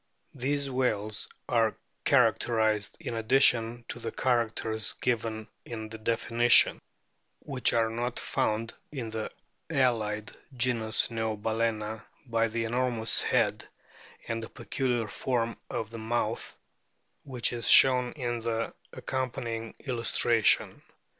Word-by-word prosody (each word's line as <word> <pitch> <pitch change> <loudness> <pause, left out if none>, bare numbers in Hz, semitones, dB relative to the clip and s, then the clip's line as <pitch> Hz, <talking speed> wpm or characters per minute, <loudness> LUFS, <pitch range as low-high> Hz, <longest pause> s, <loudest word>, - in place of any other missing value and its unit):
These 140 +2 -1
whales 110 -5 -1 0.2
are 115 -3 +2 0.3
characterised, 110 -3 +2
in - - -5
addition 115 0 +3
to - - -4
the 115 - -4
characters 115 -3 0
given 110 -3 -2 0.2
in 110 -2 -7
the 110 0 -8
definition 115 +1 +4 0.6
which 135 -3 0
are 115 -1 +3
not 120 +2 -3
found 110 +2 -1 0.2
in 125 -7 -5
the 110 -1 -3 0.4
allied 110 -7 0 0.3
genus 115 -3 +1
Neobal&na, 110 -1 -1 0.3
by 115 -2 +1
the 115 +1 -2
enormous 120 -1 +1
head - - +1 0.6
and 115 0 -2
the 110 - -7
peculiar 125 -5 -2
form 115 +1 -1
of 110 -1 -4
the 115 - -7
mouth, 110 0 -2 0.7
which 125 -3 -1
is 120 -1 -2
shown 125 -2 +7
in 120 -5 -3
the 115 0 -2 0.2
accompanying 115 -3 -4
illustra 120 -3 +1
tion. - - +3
115 Hz, 115 wpm, -29 LUFS, 110-125 Hz, 0.7 s, shown